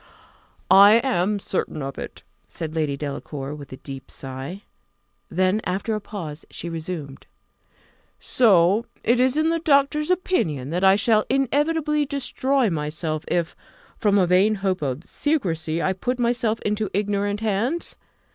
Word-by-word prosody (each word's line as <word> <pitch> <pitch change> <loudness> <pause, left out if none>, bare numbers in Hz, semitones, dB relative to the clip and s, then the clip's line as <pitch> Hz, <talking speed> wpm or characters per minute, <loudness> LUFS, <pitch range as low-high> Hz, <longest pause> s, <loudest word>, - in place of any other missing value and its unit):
"I 200 +2 +9
am 210 -5 +2
certain 180 -6 -3
of 135 0 -6
it," - - -8 0.2
said 160 -2 -6
Lady 150 -3 -1
Delacour, 140 -1 -5
with 145 -2 -10
a 130 - -7
deep 135 -1 -9
sigh. 135 +9 -6 0.7
Then, 185 +4 +1
after 195 +5 -2
a 215 - -2
pause, 170 -8 -7
she 170 - -6
resumed: 160 -4 -6 0.9
"So 205 -2 +3 0.2
it 240 +2 +3
is 255 +1 +3
the 325 +1 +1
doctor's 300 +1 +3
opinion, 170 - 0
that 180 +3 -1
I 190 0 +7
shall 215 +1 +3
inevitably 295 +3 +1
destroy 270 -1 0
myself 155 0 -3
if, 170 -1 -1 0.4
from 205 -1 +3
a 190 - +4
vain 190 +5 +3
hope 185 -2 0
of 140 +2 -3
secrecy, 170 - -1
I 190 - +1
put 245 +7 -2
myself 235 -2 0
into 210 0 -1
ignorant 205 0 -1
hands? 225 - -1
200 Hz, 140 wpm, -23 LUFS, 160-245 Hz, 0.9 s, I